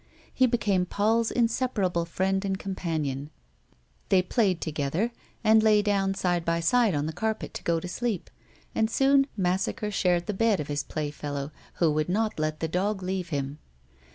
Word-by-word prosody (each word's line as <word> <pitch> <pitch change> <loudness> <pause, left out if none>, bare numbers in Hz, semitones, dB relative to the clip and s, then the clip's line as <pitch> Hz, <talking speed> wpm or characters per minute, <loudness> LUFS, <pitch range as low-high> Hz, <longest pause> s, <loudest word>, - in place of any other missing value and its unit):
He 260 - +4
be 240 - +1
came 190 -5 +1
Paul's 225 +4 +2
inseparable 225 -8 0
friend 190 +3 0
and 195 -1 -1
companion; 155 -8 -3 0.8
they 185 -1 +4
played 190 -3 +1
together, 160 - -1 0.3
and 220 0 +6
lay 215 -1 +4
down 195 -2 +1
side 175 -3 0
by 165 0 0
side 215 +3 +3
on 145 0 0
the 160 - -3
carpet 220 +4 -2
to - - -7
go 170 -1 +1
to 180 - -6
sleep, 220 0 -3 0.4
and 220 0 +1
soon 275 +2 +4
Massacre 190 +4 0
shared 180 -3 +1
the 210 - -2
bed 220 0 +2
of 150 - -4
his 145 0 0
playfellow, 145 -1 -4 0.2
who 165 -3 +3
would 155 +2 0
not 215 0 0
let 155 0 -2
the 160 - 0
dog 190 +4 -1
leave 185 -1 -2
him. 140 -1 -3
185 Hz, 175 wpm, -27 LUFS, 160-215 Hz, 0.8 s, and